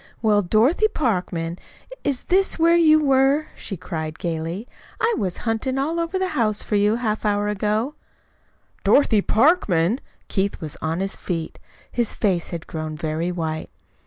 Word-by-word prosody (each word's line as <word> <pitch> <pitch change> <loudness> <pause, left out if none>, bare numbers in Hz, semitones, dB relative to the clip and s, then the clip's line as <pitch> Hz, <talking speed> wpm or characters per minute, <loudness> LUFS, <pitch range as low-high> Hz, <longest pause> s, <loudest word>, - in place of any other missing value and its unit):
"Well, 210 -2 +4
Dorothy 230 - +3
Parkman, 180 - -2 0.4
is 280 -3 -1
this 385 +2 +2
where 335 +1 +5
you 310 -2 +6
were?" 275 +1 +3
she 195 - -6
cried 160 -2 -5
gayly. 170 +6 -3 0.3
"I 455 +1 +2
was 185 -3 -2
hunting 230 +4 -1
all 315 +5 0
over 335 +3 -1
the 375 0 0
house 220 - +1
for - - -6
you 205 +2 +3
half 220 -3 -2
an 210 - +2
hour 205 0 -1
ago." 210 +6 0 0.9
"DOROTHY 225 -7 +4
PARKMAN!" 220 - +3 0.3
Keith 200 0 -1
was 155 -4 -6
on 160 +3 -1
his 195 0 -2
feet. 165 -3 -4 0.3
His 240 -2 -1
face 185 -6 +1
had 170 -2 -6
grown 155 -1 -5
very 160 +3 -2
white. 160 -3 -3
210 Hz, 160 wpm, -22 LUFS, 170-275 Hz, 0.9 s, you